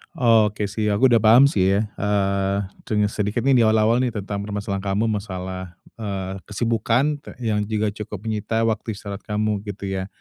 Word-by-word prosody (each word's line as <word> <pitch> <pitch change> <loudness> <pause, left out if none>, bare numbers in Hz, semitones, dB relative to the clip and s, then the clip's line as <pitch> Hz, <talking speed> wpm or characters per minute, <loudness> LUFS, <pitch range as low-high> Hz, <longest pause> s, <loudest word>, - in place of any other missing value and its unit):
Oke 110 -6 +3
sih, 110 0 -1
aku 110 +5 +3
udah 115 - +6
paham 115 +5 +7
sih 95 0 +2
ya, 100 - +2 0.2
eee, 100 -1 +1 0.3
tanya 105 -1 +2
sedikit 105 +3 -1
nih, 135 -1 +4
di - - +5
awal-awal 110 +2 +3
nih, 125 -2 0
tentang 100 0 -4
permasalahan 100 -1 -3
kamu 100 +3 +1
masalah, 95 -3 -5 0.2
eee, 95 -3 -4
kesibukan 115 +7 0
te - - -11
yang 105 -2 +1
juga 110 -1 0
cukup 105 -1 -7
menyita 110 +1 -1
waktu 110 -1 -1
istirahat 100 0 -7
kamu, 105 -1 0
gitu 100 0 -7
ya? 95 0 -3
105 Hz, 175 wpm, -22 LUFS, 100-110 Hz, 0.3 s, paham